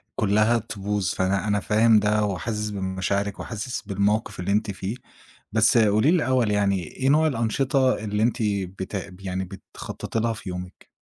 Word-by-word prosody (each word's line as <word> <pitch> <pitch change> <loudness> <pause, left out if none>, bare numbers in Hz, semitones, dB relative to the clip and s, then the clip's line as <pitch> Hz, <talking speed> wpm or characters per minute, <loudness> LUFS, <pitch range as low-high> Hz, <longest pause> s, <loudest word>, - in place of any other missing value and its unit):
كلها 110 +3 +3
تبوظ، 105 -3 -2
فأنا 95 +2 0
أنا 105 0 +2
فاهم 110 +2 +4
ده، 105 +1 +2
وحاسس 105 +2 -2
بمشاعرِك، 100 0 -2
وحاسس 120 +4 -4
بالموقف 100 +1 -1
اللي 90 +3 -1
أنتِ 105 0 +1
فيه. 95 +3 -4 0.6
بس 110 +1 +4
قولي 110 +5 +4
لي - - +4
الأول 130 -9 +2
يعني 100 -3 +1
إيه 130 +10 -2
نوع 155 +3 +4
الأنشطة 130 +1 +1
اللي 105 0 0
أنتِ 115 +1 +1 0.4
بت 95 0 -4
يعني 95 0 -3
بتخططي 115 - -6
لها 115 +1 0
في 105 -3 -8
يومِك؟ 90 0 -8
105 Hz, 160 wpm, -24 LUFS, 100-115 Hz, 0.6 s, فاهم